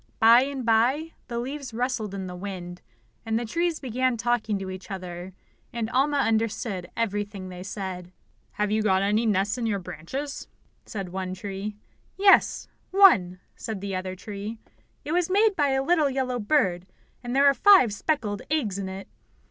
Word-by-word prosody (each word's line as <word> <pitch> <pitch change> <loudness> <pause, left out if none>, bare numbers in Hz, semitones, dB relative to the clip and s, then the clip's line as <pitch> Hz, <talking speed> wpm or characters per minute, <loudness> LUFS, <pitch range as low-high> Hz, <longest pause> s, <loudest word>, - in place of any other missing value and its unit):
By 230 +2 +7
and 275 -3 -5
by 250 +8 +2 0.2
the 235 - -4
leaves 265 0 -5
rustled 230 -5 -2
in 190 -1 -4
the 180 -1 -7
wind, 180 -2 -7 0.4
and 225 0 -1
the 235 - -2
trees 335 +7 -1
began 255 -1 0
talking 225 -2 0
to 190 -1 -5
each 185 +2 -9
other, 180 -1 -6 0.4
and 230 -1 -3
Alma 285 +4 +2
understood 220 -6 -1
everything 205 -3 -2
they 180 -1 -8
said. 185 -2 -6 0.4
"Have 210 0 -1
you 215 +1 +2
got 190 -2 +2
any 210 +3 +2
nests 205 +3 +1
in 230 - -1
your 205 -2 0
branches?" 185 - -6 0.4
said 195 -4 -5
one 185 0 -4
tree. 200 +2 -5 0.4
"Yes, 390 0 +4 0.2
one," 190 - +5
said 220 -4 -5
the 195 0 -4
other 185 0 -4
tree. 205 +3 -7 0.5
"It 295 - -3
was 350 0 +1
made 410 +2 +3
by 290 -4 +2
a 265 0 +1
little 315 -2 +3
yellow 255 -2 -1
bird, 200 -8 +1 0.4
and 245 +1 -3
there 280 +1 +5
are 280 - +7
five 275 - +6
speckled 210 -5 -1
eggs 230 -11 0
in 190 -1 -4
it." 190 +1 -7
220 Hz, 170 wpm, -26 LUFS, 190-265 Hz, 0.5 s, By